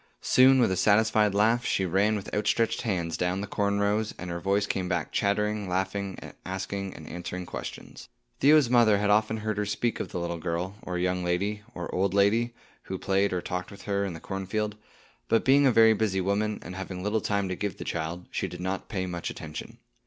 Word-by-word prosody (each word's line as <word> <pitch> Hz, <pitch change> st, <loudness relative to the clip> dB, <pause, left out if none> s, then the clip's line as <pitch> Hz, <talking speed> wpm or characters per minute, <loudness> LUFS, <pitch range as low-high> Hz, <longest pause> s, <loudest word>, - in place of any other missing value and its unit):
Soon, 130 Hz, +1 st, +6 dB
with 120 Hz, -, +3 dB
a -, -, +1 dB
satisfied 105 Hz, +1 st, +3 dB
laugh, 115 Hz, +4 st, +3 dB
she 95 Hz, -, +1 dB
ran 100 Hz, +5 st, +2 dB
with 100 Hz, -2 st, -6 dB
outstretched 115 Hz, +2 st, +1 dB
hands 90 Hz, -8 st, -1 dB
down 90 Hz, +2 st, 0 dB
the -, -, -3 dB
corn 100 Hz, 0 st, 0 dB
rows, 105 Hz, +2 st, 0 dB
and 90 Hz, -1 st, -6 dB
her 85 Hz, -, -3 dB
voice 100 Hz, +3 st, +1 dB
came 95 Hz, -3 st, -2 dB
back 85 Hz, -4 st, -1 dB
chattering, 105 Hz, 0 st, 0 dB
laughing, 95 Hz, +1 st, -2 dB, 0.3 s
asking 95 Hz, +1 st, -4 dB
and -, -, -10 dB
answering 90 Hz, +1 st, -5 dB
questions. -, -, -8 dB, 0.3 s
Theo's 150 Hz, -2 st, +6 dB
mother 115 Hz, -4 st, +5 dB
had 105 Hz, 0 st, +1 dB
often 110 Hz, +1 st, +2 dB
heard 110 Hz, -1 st, -3 dB
her 105 Hz, -, 0 dB
speak 115 Hz, +3 st, -1 dB
of -, -, -4 dB
the 90 Hz, -, -4 dB
little 85 Hz, -1 st, -3 dB
girl, 85 Hz, +4 st, -3 dB
or 90 Hz, -1 st, -4 dB
young 90 Hz, 0 st, 0 dB
lady, 100 Hz, +4 st, -1 dB
or 85 Hz, -1 st, -5 dB
old 95 Hz, +1 st, +1 dB
lady, 110 Hz, +4 st, +3 dB, 0.3 s
who 95 Hz, -, -4 dB
played 95 Hz, +1 st, +1 dB
or 90 Hz, -1 st, -2 dB
talked 90 Hz, 0 st, -4 dB
with 100 Hz, -, -12 dB
her 100 Hz, -1 st, 0 dB
in 95 Hz, -3 st, -3 dB
the 80 Hz, -, -8 dB
cornfield; 105 Hz, +2 st, -3 dB, 0.5 s
but 115 Hz, -, +2 dB
being 140 Hz, +1 st, +6 dB
a -, -, +5 dB
very 110 Hz, -1 st, +6 dB
busy 105 Hz, -3 st, 0 dB
woman, 105 Hz, +3 st, 0 dB
and 90 Hz, -, -7 dB
having 95 Hz, -1 st, -6 dB
little 105 Hz, +2 st, 0 dB
time 100 Hz, -1 st, 0 dB
to 90 Hz, -, -2 dB
give 100 Hz, -1 st, -3 dB
the -, -, -6 dB
child, 85 Hz, +2 st, -3 dB
she -, -, -2 dB
did 90 Hz, 0 st, -8 dB
not 95 Hz, +1 st, -3 dB
pay 95 Hz, -3 st, -2 dB
much 85 Hz, -2 st, -4 dB
attention. 75 Hz, -1 st, -8 dB
100 Hz, 210 wpm, -27 LUFS, 90-105 Hz, 0.5 s, Soon